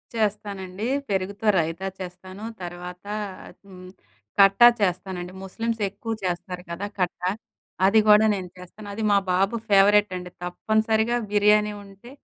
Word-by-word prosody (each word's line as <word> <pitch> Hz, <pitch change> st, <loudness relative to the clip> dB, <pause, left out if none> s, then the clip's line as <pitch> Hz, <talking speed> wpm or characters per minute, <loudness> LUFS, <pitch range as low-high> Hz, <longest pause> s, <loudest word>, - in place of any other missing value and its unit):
చేస్తానండి. 205 Hz, -1 st, -2 dB, 0.2 s
పెరుగుతో 200 Hz, +2 st, -2 dB
రైతా 165 Hz, +4 st, -2 dB
చేస్తాను 185 Hz, +2 st, -9 dB, 0.2 s
తర్వాత 180 Hz, +1 st, -8 dB, 0.6 s
హ్మ్, 185 Hz, -1 st, -12 dB, 0.5 s
కట్టా 195 Hz, +4 st, +8 dB
చేస్తానండి. 180 Hz, -1 st, -2 dB
ముస్లిమ్స్ 225 Hz, +3 st, -3 dB
ఎక్కువ 210 Hz, +3 st, -5 dB
చేస్తారు 180 Hz, 0 st, -4 dB
కదా, 195 Hz, +4 st, -4 dB
కట్టా. 180 Hz, 0 st, -1 dB, 0.5 s
అది 215 Hz, +3 st, +5 dB
గుడా 210 Hz, +1 st, +7 dB
నేను 185 Hz, -2 st, -6 dB
చేస్తాను. 180 Hz, +4 st, -12 dB
అది 220 Hz, +1 st, -4 dB
మా 200 Hz, -, +5 dB
బాబు 195 Hz, +5 st, +2 dB
ఫేవరెట్ 205 Hz, 0 st, +5 dB
అండి 180 Hz, 0 st, -8 dB
తప్పనిసరిగా 220 Hz, +5 st, +1 dB
బిర్యానీ 210 Hz, 0 st, +4 dB
ఉంటే 200 Hz, +5 st, -15 dB
195 Hz, 120 wpm, -24 LUFS, 180-210 Hz, 0.6 s, కట్టా